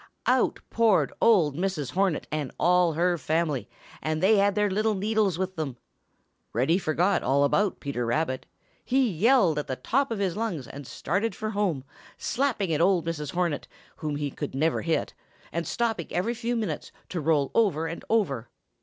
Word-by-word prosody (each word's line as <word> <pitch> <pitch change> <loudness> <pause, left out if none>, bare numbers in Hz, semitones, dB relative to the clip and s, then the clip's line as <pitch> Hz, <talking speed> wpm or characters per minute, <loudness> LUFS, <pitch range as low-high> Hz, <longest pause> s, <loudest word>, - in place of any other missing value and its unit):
Out - - +2
poured 225 -3 +3
old 175 -11 +4
Mrs. 175 -6 -2
Hornet 190 -4 +1
and 150 -4 -2
all 180 -1 +4
her 175 +2 +1
family, 155 -5 -1 0.3
and 155 0 -1
they 205 +5 +5
had 200 0 +3
their 210 0 +3
little 215 +2 +1
needles 205 -2 +1
with 190 0 -2
them. 140 -6 -4 0.8
Reddy 135 - +2
forgot 180 +3 +1
all 140 +2 +2
about 195 +8 +2
Peter 140 -4 -3
Rabbit. 130 +2 -1 0.4
He 265 0 +2
yelled 195 - +3
at 150 - -4
the 130 - -2
top 270 - 0
of 225 - -2
his 190 -3 -1
lungs 205 - -2
and 140 -2 -9
started 200 +6 -1
for 215 -2 -3
home, 195 -10 0 0.3
slapping 235 -10 0
at 150 - +1
old 180 -2 +3
Mrs. 150 -4 -3
Hornet, 175 -4 -1 0.3
whom 150 -2 -3
he 145 -1 -3 0.2
never 155 +4 +1
could - - -7
hit, 165 - 0 0.4
and 170 0 -2
stopping 225 -8 -1
every 195 +7 0
few 240 +1 -2
minutes 210 -10 -3 0.2
to 175 - -3
roll 150 -2 +2
over 190 -9 +2
and 165 +1 -5
over. 140 - +1
175 Hz, 175 wpm, -27 LUFS, 150-210 Hz, 0.8 s, they